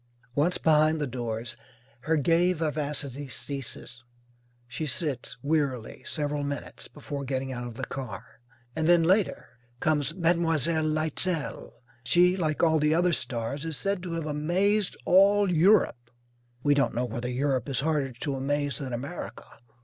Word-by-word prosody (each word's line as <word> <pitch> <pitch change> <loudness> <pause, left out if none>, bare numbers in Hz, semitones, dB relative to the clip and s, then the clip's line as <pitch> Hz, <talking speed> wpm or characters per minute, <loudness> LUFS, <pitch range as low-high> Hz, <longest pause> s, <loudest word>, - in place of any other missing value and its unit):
Once 155 +7 +1
behind 155 0 +3
the 150 - 0
doors 120 -2 -4 0.5
her 160 0 +2
gay 170 +5 +3
vivacity 150 -3 -2
ceases. 130 -2 -6 0.6
She 150 +6 -4
sits, 140 -1 -2
wearily, 140 -6 -1
several 145 -1 -2
minutes, 140 0 -5
before 145 -1 -6
getting 135 0 -3
out 120 -1 -5
of 120 - -9
the 130 - -4
car. 120 -8 -8 0.4
And 160 0 0
then, 175 -1 +5
later, 190 +4 +2 0.3
comes 150 -4 +1
Mlle. 170 -1 +2 0.5
Leitzel. 155 +1 0 0.3
She, 175 +9 +4
like 155 -4 -1
all 160 -1 +4
the 150 +1 +3
other 175 +1 +3
stars, 125 +1 -2
is 160 -3 -3
said 200 -2 -1
to 175 -2 -5
have 165 -2 -3
"amazed 180 +7 +1
all 200 +1 +5
Europe." 165 - +3 0.5
We 145 - +4
don't 140 -4 +1
know 125 +1 0
whether 120 +1 -4
Europe 130 0 0
is 135 -2 -1
harder 150 -3 0
to 135 +3 -4
amaze 140 -1 -1
than 130 -3 -5
America. 140 +8 -6
150 Hz, 150 wpm, -27 LUFS, 130-165 Hz, 0.6 s, then